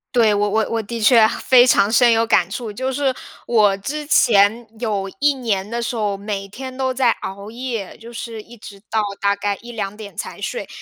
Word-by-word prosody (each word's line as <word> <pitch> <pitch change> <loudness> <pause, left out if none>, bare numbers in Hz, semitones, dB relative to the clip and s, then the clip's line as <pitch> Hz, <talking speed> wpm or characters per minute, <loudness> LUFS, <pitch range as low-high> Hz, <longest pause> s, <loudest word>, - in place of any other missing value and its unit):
对， 225 -3 +4
我 205 0 +1
我 220 +1 +1
我 230 0 0
的 230 +2 -6
确 225 0 +6
非 245 +2 +4
常 200 -3 +4
深 240 +1 +5
有 225 0 +3
感 230 - +2
触， 230 -4 -5
就 260 +5 -3
是 270 0 0 0.3
我 210 -4 +3
之 295 +9 -5
前 225 -4 +4
有 210 -5 -2
1 290 -1 +3
年 210 -7 -2
的 235 +1 -3
时 235 - -3
候， 205 -3 -1
每 200 -1 -5
天 260 +6 -8
都 260 0 -1
在 255 -2 +2
熬 200 +2 -7
夜， 235 -5 -5
就 230 +1 -12
是 230 -1 -7
一 240 +3 -15
直 205 -2 -12
到 220 -1 +1 0.2
大 200 0 +2
概 200 0 -2
1-2 215 -4 -5
点 210 -2 -11
才 - - -6
睡， - - -4
225 Hz, 210 characters per minute, -20 LUFS, 205-245 Hz, 0.3 s, 确